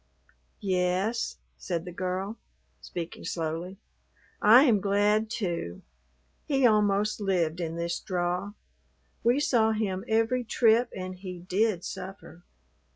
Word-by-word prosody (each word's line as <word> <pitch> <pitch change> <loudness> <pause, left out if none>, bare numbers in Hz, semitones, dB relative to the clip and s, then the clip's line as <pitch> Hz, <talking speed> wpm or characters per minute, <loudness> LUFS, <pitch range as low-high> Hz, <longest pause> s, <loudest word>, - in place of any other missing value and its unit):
"Yes," 190 +3 0 0.2
said 170 -2 -3
the 180 - -6
girl; 185 +4 -3 0.4
speaking 170 -1 -6
slowly. 165 +3 -3 0.6
"I 230 +6 +8
am 225 -8 +4
glad, 210 +2 +2
too. 170 - -3 0.6
He 270 -3 +3
almost 210 -1 +3
lived 175 -4 0
in 165 -1 -3
this 170 0 -2
draw. 180 +1 -2 0.7
We 240 +4 +3
saw 225 -6 +3
him 195 -4 -2
every 225 +3 +1
trip 230 +1 +3
and 185 0 -5
he 185 -2 -7
did 185 +1 0
suffer. 190 -2 -8
195 Hz, 115 wpm, -28 LUFS, 180-220 Hz, 0.7 s, I